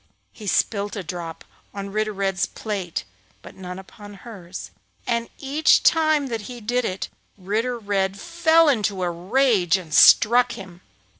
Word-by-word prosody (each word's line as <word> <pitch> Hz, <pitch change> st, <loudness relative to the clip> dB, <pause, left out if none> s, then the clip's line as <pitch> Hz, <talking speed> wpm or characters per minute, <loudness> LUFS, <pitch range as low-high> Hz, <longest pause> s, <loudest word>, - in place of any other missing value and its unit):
He 210 Hz, -, -10 dB
spilt 205 Hz, +1 st, 0 dB
a 200 Hz, -, -4 dB
drop 170 Hz, -1 st, -7 dB, 0.3 s
on 200 Hz, 0 st, -5 dB
Ritter 215 Hz, +1 st, -1 dB
Red's 195 Hz, -1 st, -1 dB
plate 195 Hz, -6 st, -4 dB, 0.4 s
but -, -, -11 dB
none 180 Hz, -1 st, -8 dB
upon 205 Hz, +2 st, -12 dB
hers, 195 Hz, -5 st, -10 dB, 0.3 s
and 235 Hz, -1 st, -1 dB
each 285 Hz, +3 st, +3 dB
time 310 Hz, -3 st, +3 dB
that 230 Hz, -4 st, -4 dB
he 245 Hz, -1 st, -8 dB
did 240 Hz, +2 st, -1 dB
it 185 Hz, +1 st, -3 dB, 0.3 s
Ritter 220 Hz, +6 st, -2 dB
Red 200 Hz, -3 st, -1 dB
fell 330 Hz, -, +3 dB
into 205 Hz, -8 st, +1 dB
a 175 Hz, -, 0 dB
rage 190 Hz, 0 st, +2 dB
and 165 Hz, -5 st, -9 dB
struck 240 Hz, +7 st, +6 dB
him. 185 Hz, -5 st, -11 dB
205 Hz, 150 wpm, -23 LUFS, 190-245 Hz, 0.4 s, struck